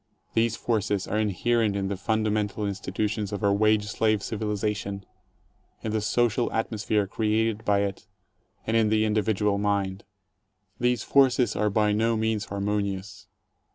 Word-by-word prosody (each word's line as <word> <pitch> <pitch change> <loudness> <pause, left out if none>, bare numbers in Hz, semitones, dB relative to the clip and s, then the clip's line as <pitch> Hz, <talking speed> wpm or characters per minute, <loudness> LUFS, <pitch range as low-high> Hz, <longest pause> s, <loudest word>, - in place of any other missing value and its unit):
These 115 0 +2
forces 105 -4 -1
are 105 - 0
inherent 110 +1 +1
in 100 -1 -1
the 100 - -2
fundamental 105 0 -1
institutions 105 +1 -2
of 105 +1 -4
our 100 -1 +4
wage 105 0 +3
slave 110 0 0
civilization, 105 -2 -3 0.8
in 110 - -2
the 110 0 0
social 120 +2 +1
atmosphere 110 -2 0
created 110 +1 0
by 100 -1 +2
it, 100 +1 -5 0.6
and 110 - 0
in 110 -2 +3
the 110 0 +2
individual 105 -1 +1
mind. 100 -2 -1 0.8
These 125 -2 +1
forces 130 -4 +3
are 105 - +1
by 105 +1 +2
no 110 +2 +1
means 110 -1 0
harmonious. 100 -1 -3
105 Hz, 140 wpm, -26 LUFS, 100-110 Hz, 0.8 s, our